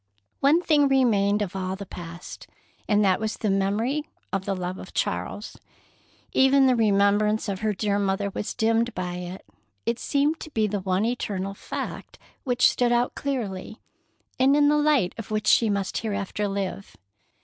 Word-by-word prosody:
One 305 +6 +4
thing 295 -4 +4
remained 210 -6 +3
of 195 -2 -6
all 190 0 -2
the 200 +1 -7
past, 170 -1 -9 0.4
and 210 -1 +3
that 185 -1 +3
was 220 0 -3
the 210 - 0
memory 220 +10 0 0.2
of 195 -1 -1
the 195 - -1
love 180 0 -4
of - - -11
Charles. - - -3 0.8
Even 265 +1 +5
the 255 -1 +4
remembrance 210 0 +2
of 195 -2 -3
her 215 0 0
dear 205 0 0
mother 200 0 0
was 205 - -4
dimmed 230 +1 +1
by 180 -1 -3
it. 180 +1 -7 0.4
It 235 +1 -1
seemed 290 +3 +1
to - - -8
be 220 -7 +1
the 205 -1 -1
one 190 +2 0
eternal 200 -5 -2
fact - - -6 0.3
which 250 -2 +4
stood 245 -1 +1
out 240 +1 +2
clearly, 220 -7 -4 0.6
and 270 +2 +5
in 290 0 +5
the 300 - +4
light 295 -11 +2
of 225 - -7
which 215 0 -2
she 225 - +4
must 200 -2 -1
hereafter 205 -1 -2
live. 195 0 -4
210 Hz, 170 wpm, -25 LUFS, 195-245 Hz, 0.8 s, Even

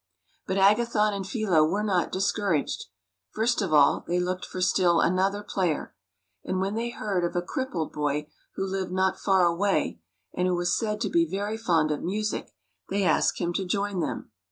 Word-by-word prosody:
But 190 - -1
Agathon 210 +1 +3
and 195 -1 -4
Philo 195 -9 +2
were 200 +7 0
not 185 -5 0
discouraged. 190 -4 0 0.4
First 230 +2 0
of 190 -5 -2
all 145 -2 +4
they 175 +1 +1
looked 180 +1 -2
for 185 - -6
still 180 -2 +3
another 195 +3 +1
player; 185 -6 -2 0.5
and 185 - -2
when 195 +2 -1
they 230 +2 -2
heard 200 -6 -2
of 175 - -2
a 175 - +1
crippled 190 - -3
boy 150 0 -1 0.3
who 195 - -2
lived 190 -1 -3
not 190 +1 +1
far 190 -2 +3
away, 175 - 0 0.3
and 180 0 0
who 180 - +1
was 175 0 +1
said 210 -1 -2
to 210 - 0
be 165 -1 +2
very 205 +4 -2
fond 165 -8 +1
of 150 - -2
music, 210 +4 -2 0.4
they 200 +1 0
asked 165 -4 +2
him 175 -1 -1
to 195 - -1
join 200 +1 -1
them. 165 - -4
190 Hz, 185 wpm, -26 LUFS, 175-205 Hz, 0.5 s, all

